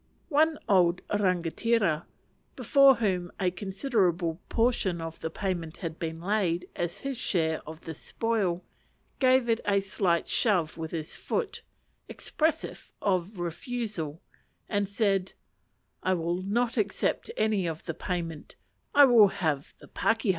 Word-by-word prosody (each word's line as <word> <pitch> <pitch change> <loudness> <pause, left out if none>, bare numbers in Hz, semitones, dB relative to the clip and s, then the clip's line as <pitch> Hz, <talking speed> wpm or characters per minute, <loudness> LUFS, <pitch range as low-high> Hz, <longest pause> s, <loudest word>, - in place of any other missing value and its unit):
One 310 +1 +3
old 180 -3 +4
rangatira, 185 -1 +1 0.5
before 275 -2 +6
whom 185 -6 -1
a 185 -2 +2
considerable 185 - 0
portion 225 -7 +1
of 165 0 -6
the 160 - -3
payment 170 -3 -3
had 165 -3 -5
been 165 -1 -4
laid 180 -2 0
as 175 0 -3
his 275 -3 -4
share 160 -8 0
of 160 +1 -8
the 160 - -6
spoil, 195 0 -1 0.6
gave 255 -2 +4
it 230 -1 +1
a 200 -1 +3
slight 190 -3 0
shove 180 -9 +1
with 160 -1 -5
his 160 -2 -5
foot, 465 -3 -3 0.5
expressive 315 +1 -2
of 185 0 -1
refusal, 175 - -4 0.4
and 205 -1 0
said, 200 -3 +1 0.7
"I 185 0 +2
will 170 +1 -1
not 230 +5 0
accept 205 - 0
any 210 -5 +1
of 160 -1 -4
the 165 - -3
payment; 165 -3 -4 0.4
I 285 0 +9
will 235 -5 +7
have 155 -7 -2
the - - -15
pakeha." 225 -1 0
190 Hz, 135 wpm, -28 LUFS, 170-225 Hz, 0.7 s, I